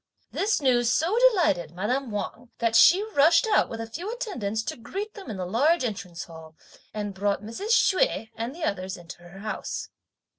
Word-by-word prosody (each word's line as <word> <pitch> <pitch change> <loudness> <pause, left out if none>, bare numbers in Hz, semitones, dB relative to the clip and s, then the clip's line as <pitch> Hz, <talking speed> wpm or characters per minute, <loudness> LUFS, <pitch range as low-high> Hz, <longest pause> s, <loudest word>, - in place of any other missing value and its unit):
This 420 +2 +1
news 245 -4 +3
so 330 - +1
delighted 195 - 0
madame 245 +8 -1
Wang 225 +3 -5
that 230 -1 0
she 365 - +7
rushed 320 +7 +5
out, 440 - +3
with 225 - -6
a 225 - -3
few 345 - -6
attendants, 245 - -3
to - - -4
greet 395 - -6
them 395 -3 -10
in 210 - -5
the 185 - -3
large 275 - +2
Entrance 200 -7 -4
Hall, 160 -1 -12 0.4
and 205 -1 -4
brought 200 +1 -1
Mrs. 230 - -6
Hsüeh 380 - +2
and 235 +5 -4
the 340 - -7
others 190 -7 -2
into 175 0 -11
her 175 +3 -12
house. 215 0 -4
230 Hz, 185 wpm, -26 LUFS, 200-335 Hz, 0.4 s, she